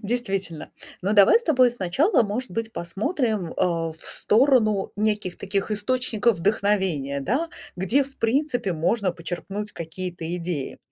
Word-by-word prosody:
Действительно. 195 -7 -3 0.3
Ну, 200 +3 +1
давай 205 - +7
с 470 - -12
тобой 255 - +4
сначала, 240 - +2
может 230 +3 -3
быть, 225 +4 -4
посмотрим, 210 - -2
а, 165 -3 0
в - - -17
сторону 215 -4 +2
неких 210 -3 -1
таких 195 +1 -2
источников 225 0 +1
вдохновения, 190 -8 0
да, 265 - -1 0.3
где 235 +10 +2
в 275 0 -17
принципе 245 -3 0
можно 180 +4 0
почерпнуть 190 +5 -5
какие-то 170 +1 -6
идеи. 165 -6 -4
205 Hz, 130 wpm, -24 LUFS, 180-240 Hz, 0.3 s, давай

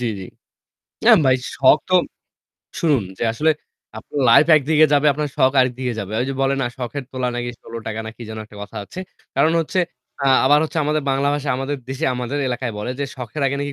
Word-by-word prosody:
জ্বি, 125 - -1
জ্বি। 95 - -7 0.8
না - - +7 0.2
ভাই 130 -1 +5 0.2
শখ 135 +2 +5
তো 185 - +1 0.9
শুনুন 150 - +2 0.2
যে - - -1
আসলে 155 +7 +2 0.5
আ - - -4
আপু - - -16 0.2
লাইফ 115 +7 +7
একদিকে 155 +2 +4
যাবে, 145 +1 +4
আপনার 150 +1 -2
শখ 130 -2 +4
আরেকদিকে 125 0 0
যাবে। 100 +1 -6
ওই - - +1
যে - - -3
বলে 135 0 +2
না, 130 - 0
শখের 130 +2 -4
তোলা 130 -1 -1
নাকি 120 0 -3
৳16 110 -1 -6
না - - -5
কি - - -10
যেন 110 - -6
একটা 105 - -16
কথা 100 - -10
আছে। 140 - -11 0.4
কারণ 160 - +4
হচ্ছে, 165 +3 -2 0.5
আ - - +3 0.2
আবার 145 +2 +5
হচ্ছে 160 +1 -3
আমাদের 150 +1 0
বাংলা 135 +1 +1
ভাষায়, 145 -1 -1
আমাদের 135 +2 -3
দেশে; 135 +4 -3
আমাদের 125 +3 -3
এলাকায় 125 -1 -3
বলে 105 +4 -3
যে, 140 - -1
"শখের 125 +3 -5
আগে 135 +1 -1
নাকি 145 0 -3
135 Hz, 215 wpm, -20 LUFS, 120-145 Hz, 0.9 s, না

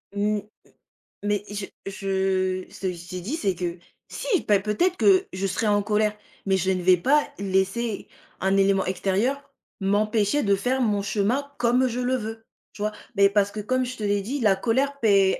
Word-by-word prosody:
Mmh, 210 +1 +1 0.3
m - - -25 0.5
mais 205 -1 0
je 205 -1 -4 0.2
je 190 -1 -1
ce - - -13
que 185 - 0
je 175 0 -11
t'ai 185 0 -5
dit, 240 - -3
c'est 195 - 0
que, 175 0 -4 0.3
si! 405 -9 -1
Bah, 205 - +5
peut-être 275 - +1
que 385 -1 +4
je 190 +1 -2
serais 215 +4 -1
en 205 -1 +3
colère, 210 0 +1 0.3
mais 190 - +3
je 190 0 0
ne 185 -1 0
vais 180 0 +6
pas 290 - +3
laisser 195 +3 -1 0.3
un 190 +1 +2
élément 195 -1 +3
extérieur 200 +10 -1 0.3
m'empêcher 210 +6 +1
de 200 -1 +3
faire 250 +7 0
mon 210 -5 +1
chemin 215 +8 0
comme 245 +2 +3
je 245 +1 -3
le 250 +1 +1
veux, 225 -1 -6 0.3
tu 205 - -8
vois? 210 0 0 0.2
Mais 200 0 +6
parce 200 0 +2
que 210 - -5
comme 255 +4 0
je 250 +1 -6
te - - -8
l'ai 205 -1 +1
dit, 270 +7 -3
la 205 -5 +4
colère 270 +7 0
p 195 -3 +4
205 Hz, 200 wpm, -25 LUFS, 195-240 Hz, 0.5 s, vais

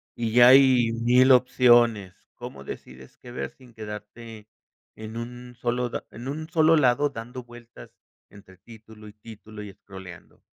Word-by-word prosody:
y 115 -2 -4
ya 120 +1 +7
hay 130 -3 +5
1000 125 +3 +3
opciones, 120 -5 +3 0.2
¿cómo 70 - -10
decides 65 -1 -11
qué 120 - -14
ver - - -5
sin 125 -3 -20
quedarte 110 +1 -10 0.5
en 110 +1 -9
un 125 +1 -9
solo 120 0 -2
da - - -6
en 120 +3 -10
un 155 +3 -6
solo 165 -1 +3
lado 140 +1 +2
dando 125 0 -9
vueltas 120 - -15 0.4
entre 100 -2 -18
título 110 +1 -16
y 105 - -13
título, 110 0 -12
y 105 - -9
escrolleando? 95 -3 -14
115 Hz, 155 wpm, -24 LUFS, 105-125 Hz, 0.5 s, ya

